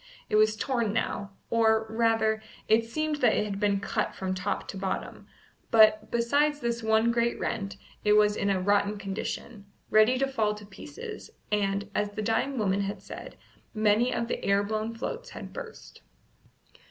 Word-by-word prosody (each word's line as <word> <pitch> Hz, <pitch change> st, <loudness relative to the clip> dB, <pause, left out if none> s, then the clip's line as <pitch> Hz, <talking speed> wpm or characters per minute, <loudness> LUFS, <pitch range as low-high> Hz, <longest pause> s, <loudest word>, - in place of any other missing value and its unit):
It -, -, +2 dB
was 215 Hz, 0 st, +4 dB
torn 230 Hz, -2 st, -1 dB
now, 200 Hz, -2 st, -2 dB, 0.2 s
or, 220 Hz, -1 st, +3 dB
rather, 220 Hz, -1 st, +1 dB, 0.3 s
it 225 Hz, +1 st, +4 dB
seemed 310 Hz, +4 st, -1 dB
that 245 Hz, -6 st, +3 dB
it -, -, +1 dB
had 200 Hz, -1 st, -4 dB
been 200 Hz, -1 st, +2 dB
cut 200 Hz, -, -2 dB
from 190 Hz, -1 st, -2 dB
top 185 Hz, +2 st, -3 dB
to -, -, -5 dB
bottom; 190 Hz, 0 st, -4 dB, 0.4 s
but, 215 Hz, -2 st, +5 dB
besides 285 Hz, +6 st, +2 dB
this 235 Hz, -2 st, -2 dB
one 220 Hz, +1 st, +3 dB
great 235 Hz, 0 st, 0 dB
rent, 200 Hz, -2 st, -3 dB, 0.3 s
it 210 Hz, -, +4 dB
was 210 Hz, 0 st, +4 dB
in 200 Hz, -, 0 dB
a 195 Hz, -1 st, +2 dB
rotten 205 Hz, +2 st, +2 dB
condition, 200 Hz, +2 st, -5 dB, 0.2 s
ready 215 Hz, +4 st, +5 dB
to 270 Hz, -, +2 dB
fall 220 Hz, -6 st, 0 dB
to 210 Hz, 0 st, -11 dB
pieces, 420 Hz, -, -9 dB, 0.2 s
and, 200 Hz, -1 st, 0 dB
as 210 Hz, 0 st, 0 dB
the 215 Hz, +1 st, -5 dB
dying 230 Hz, +5 st, 0 dB
woman 200 Hz, -2 st, +1 dB
had 200 Hz, +1 st, -4 dB
said, -, -, -9 dB, 0.4 s
many 215 Hz, +3 st, +3 dB
of 235 Hz, -, -1 dB
the -, -, -3 dB
air 200 Hz, 0 st, +3 dB
blown 215 Hz, +2 st, -2 dB
floats 475 Hz, -, -5 dB
had -, -, -9 dB
burst. -, -, -10 dB
215 Hz, 175 wpm, -28 LUFS, 205-235 Hz, 0.4 s, but